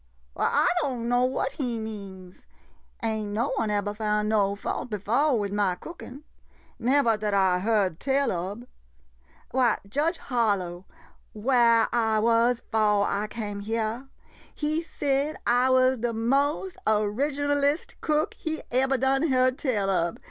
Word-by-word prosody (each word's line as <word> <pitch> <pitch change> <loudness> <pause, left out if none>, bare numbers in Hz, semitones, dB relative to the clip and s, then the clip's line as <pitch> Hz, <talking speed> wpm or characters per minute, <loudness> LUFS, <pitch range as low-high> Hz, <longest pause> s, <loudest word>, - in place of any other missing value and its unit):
Why, - - -1
I - - +2
don' 250 -5 -2
know 245 +1 +3
what 265 +1 -1
he 250 -6 -3
means. 195 -4 -9 0.6
Ain' 215 -2 -2
no 235 +6 0
one 220 - 0
ebber 205 0 -1
found 210 0 -1
no 200 -2 +2
fault 205 - -4
befo' 235 +8 +1
wid 205 -3 -2
ma 200 -3 +1
cookin' 285 - -10 0.3
— - - -33
nevah 240 -3 +3
dat 210 -1 -1
I 190 -2 +3
heard 200 -4 +1
tell 275 0 +1
ob. 190 +7 -4 0.9
Why, 250 -3 +2
Judge 300 - 0
Harlow 200 -8 -1 0.3
— - - -36
whah 230 0 +3
I 225 -2 +2
was 230 +2 +2
'fo' 210 -2 +3
I 205 +1 -1
came 205 -3 -5
hyah 225 +4 -2 0.3
— - - -25
he 310 +2 0
said 290 -2 -1
I 245 +2 +3
was 255 -1 +3
de 235 0 -1
mo^ 280 - 0
original 280 +7 +1
est 290 +4 -1
cook 305 0 0
he 315 -1 -4
ebber 265 +2 +2
done 270 +4 +1
heard 255 -1 +2
tell 210 -8 0
ob. 170 -2 -1
230 Hz, 155 wpm, -26 LUFS, 210-265 Hz, 0.9 s, know